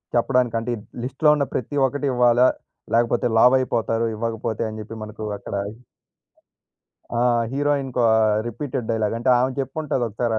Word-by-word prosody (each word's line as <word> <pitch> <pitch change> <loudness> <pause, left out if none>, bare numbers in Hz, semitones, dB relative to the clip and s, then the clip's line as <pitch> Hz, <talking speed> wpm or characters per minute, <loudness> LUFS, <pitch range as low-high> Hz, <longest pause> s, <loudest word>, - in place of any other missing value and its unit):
చెప్పడానికి 125 -1 +2
అంటే, 120 +2 -4 0.3
లిస్ట్‌లో 135 +4 +2
ఉన్న 140 - +1
ప్రతి 130 +4 -3
ఒక్కటి 145 +2 -3
ఇవ్వాల, 120 0 +4 0.5
లేకపోతే 120 +1 +2
లావయిపోతారు 120 -3 +3
ఇవ్వకపోతే 115 0 -3
అని 110 0 -7
చెప్పి 115 +1 -9
మనకు 110 0 -8
అక్కడ 100 - -7 1.6
ఆ - - +2 0.3
హీరోయిన్‌‌కు 140 -3 0 0.4
రిపీటెడ్ 120 0 -4
డైలాగ్. 110 0 0
అంటే 125 +2 0
ఆమె 130 +1 +1
చెప్పి 135 -1 -4
ఉంటాది 140 -5 -1
ఒకసారి 115 +2 -2
120 Hz, 135 wpm, -22 LUFS, 115-130 Hz, 1.6 s, ఇవ్వాల